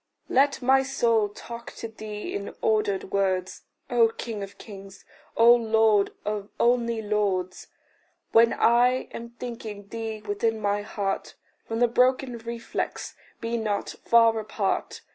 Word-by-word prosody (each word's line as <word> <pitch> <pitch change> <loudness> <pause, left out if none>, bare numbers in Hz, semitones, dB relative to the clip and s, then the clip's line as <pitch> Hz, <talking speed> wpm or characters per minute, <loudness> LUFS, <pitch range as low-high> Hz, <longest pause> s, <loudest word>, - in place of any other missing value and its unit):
Let 275 0 +2
my 265 +1 +5
soul 230 -5 +1
talk 235 +3 -9
to 230 - -6
thee 215 -1 -7
in 200 0 -5
ordered 205 -3 +1
words, 190 -2 0 0.3
O 235 -2 +5
king 225 -1 -6
of 200 0 -8
kings, 195 -2 -12 0.3
O 235 +1 +8
lord 220 -3 +3
of 210 -1 -3
only 235 -2 +2
lords! 195 -4 -1 0.6
When 230 +1 +6
I 245 +2 +3
am 235 0 -7
thinking 220 -5 -7
thee 225 -2 -5
within 220 +2 -1
my 205 0 0
heart, 200 -2 -3 0.3
From 225 - -3
the 245 - +6
broken 250 0 +2
reflex 235 +1 -4 0.3
be 230 +1 -2
not 210 -3 -2
far 230 -1 +5
apart. 215 - -2
225 Hz, 135 wpm, -26 LUFS, 205-235 Hz, 0.6 s, O